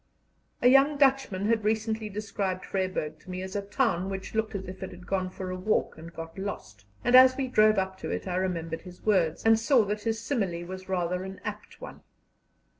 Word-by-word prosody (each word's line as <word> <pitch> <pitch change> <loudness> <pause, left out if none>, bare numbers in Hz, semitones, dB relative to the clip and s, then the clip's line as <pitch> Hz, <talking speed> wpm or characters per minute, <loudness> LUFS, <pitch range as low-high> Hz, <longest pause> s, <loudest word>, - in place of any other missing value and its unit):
A - - +7
young 275 +3 +5
Dutchman 265 -8 +2
had 225 0 +2
recently 220 0 -1
described 200 -2 -3
Vryburg 185 -5 -2
to 185 - -17
me 185 0 -4
as 190 +1 -7
a 205 - 0
town 200 -3 0
which 190 -1 -6
looked 220 -1 -1
as 190 -1 -4
if 185 0 -9
it 190 - -4
had 180 0 -12
gone 185 -1 -1
for 185 0 -6
a - - -3
walk 200 +4 0
and 165 +1 -10
got 165 +2 -8
lost, 105 - -6 0.2
and 245 - +4
as 255 0 +8
we 270 -1 -1
drove 215 -3 +4
up 190 0 -1
to - - -5
it - - -3
I 180 -1 -1
remembered 165 -3 -2
his 180 -1 -13
words, 185 -6 +2
and 225 0 +6
saw 235 -1 +4
that 210 +1 -3
his 225 0 -1
simile 195 -9 -2
was 185 +1 -8
rather 180 0 -1
an 190 0 -8
apt 210 0 -7
one. - - -9
195 Hz, 215 wpm, -28 LUFS, 185-220 Hz, 0.2 s, as